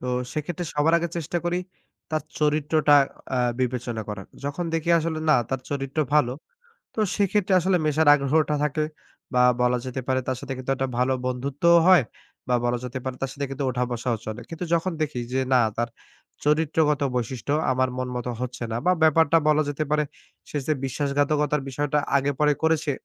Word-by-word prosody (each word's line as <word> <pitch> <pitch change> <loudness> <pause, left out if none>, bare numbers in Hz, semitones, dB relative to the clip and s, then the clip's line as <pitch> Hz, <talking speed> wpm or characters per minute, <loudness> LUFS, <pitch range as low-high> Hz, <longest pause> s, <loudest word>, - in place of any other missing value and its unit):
তো 125 - -6 0.3
সেক্ষেত্রে 165 +3 -3
সবার 150 +3 +2
আগে 170 - -2
চেষ্টা 170 +1 -2
করি, 175 +1 0 0.5
তার 155 0 -1 0.2
চরিত্রটা 150 0 +3 0.4
আ - - +1 0.2
বিবেচনা 120 -3 -2
করার। 105 -2 -6 0.2
যখন 145 +5 -2
দেখি 165 +1 0
আসলে, 160 0 -2
না 150 - +6
তার 135 -1 -1
চরিত্র 140 +1 -3 0.2
ভালো। 125 -5 +3 0.6
তো - - -2 0.2
সেক্ষেত্রে 200 -1 +1
আসলে 185 +1 +2
মেশার 155 0 +3
আগ্রহটা 150 +2 +1
থাকে 150 +1 0 0.5
বা 125 - +5 0.2
বলা 125 0 +3
যেতে 130 +1 -3
পারে 130 0 +2
তার 130 - 0
সাথে 140 -1 -5
কিন্তু 130 +1 -4
একটা 135 0 -1
ভালো 130 +1 +2
বন্ধুত্বও 140 +7 +3
হয় 185 -6 +7 0.5
বা 125 - +2
বলা 120 0 +1
যেতে 125 +1 -4
পারে 130 -1 -4
তার 135 - -2
সাথে 140 - -4
কিন্তু 135 +1 -3
ওঠা-বসাও 125 -1 -1
চলে। 110 +1 -5
কিন্তু 165 +2 -5
যখন 170 +2 0
দেখি 145 -5 -2
যে, 130 - +1
না 125 - +6 0.2
তার 120 0 0 0.6
চরিত্রগত 150 0 +2 0.2
বৈশিষ্ট্য 125 +3 -2 0.2
আমার 130 0 +1
মন 130 - -2
মতো 125 0 -3
হচ্ছে 125 -1 -5
না 115 - -1
বা 180 - +6
ব্যাপারটা 160 +1 +5
বলা 155 0 +4
যেতে 145 +2 -2
পারে 150 0 +2 0.5
সে 150 - -2
যে 155 - +2
বিশ্বাসঘাতকতার 145 +2 0
বিষয়টা 145 +2 0 0.2
আগে 140 +1 +1
পরে 150 0 +4
করেছে, 160 -2 +2
145 Hz, 180 wpm, -25 LUFS, 130-155 Hz, 0.6 s, হয়